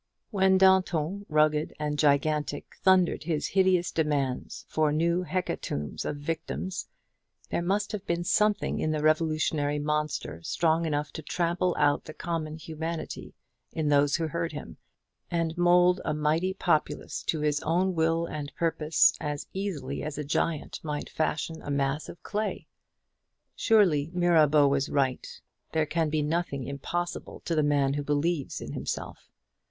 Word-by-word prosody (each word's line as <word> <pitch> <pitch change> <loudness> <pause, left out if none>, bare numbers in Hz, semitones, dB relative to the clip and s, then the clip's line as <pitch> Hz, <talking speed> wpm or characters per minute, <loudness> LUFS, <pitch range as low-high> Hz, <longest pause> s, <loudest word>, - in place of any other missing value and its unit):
When 190 -2 +4
Danton, 190 0 +3
rugged 155 0 +2
and 150 -1 -2
gigantic, 145 0 +1
thundered 185 -2 +4
his 160 -3 -1
hideous 185 -2 +3
demands 145 -5 -1
for 155 -1 +1
new 170 +3 +1
hecatombs 170 - -3
of 145 - -3
victims, 165 +5 -4 0.6
there - - 0
must 200 +4 0
have 210 -3 -4
been 170 0 0
something 210 +4 +1
in 155 - 0
the 155 -1 -1
revolutionary 155 -2 +1
monster 150 - -2
strong 165 - +1
enough 150 -1 -1
to - - -6
trample 175 +3 0
out 145 0 +2
the 155 - -9
common 160 -3 -3
humanity 160 +1 -6 0.4
in 155 -2 0
those 145 0 +4
who 165 -1 0
heard 170 0 -2
him, 145 - -8 0.5
and 165 -1 -1
mould 175 +1 +4
a - - -1
mighty 160 +5 +1
populace 170 -5 0
to 155 - 0
his 150 -1 +1
own 180 +4 +1
will 165 0 +1
and 150 -3 -5
purpose 165 -1 +3
as 145 -1 -3
easily 165 -9 -3
as 150 -1 -5
a 150 - -2
giant 150 +1 -1
might 150 -2 -4
fashion 160 +1 -2
a - - -8
mass 140 +1 -1
of 170 - -11
clay. 215 +1 -3 0.9
Surely 180 -10 +3
Mirabeau 155 -5 +5
was 140 +1 +1
right. 135 -3 0 0.5
There 160 -1 +2
can 160 +1 0
be 150 0 0
nothing 150 -3 -1
impossible 170 +6 -4
to 170 - -3
the 155 - +3
man 145 -2 +2
who 145 0 -2
believes 145 +1 -1
in - - -6
himself. - - -5
155 Hz, 150 wpm, -28 LUFS, 150-175 Hz, 0.9 s, Mirabeau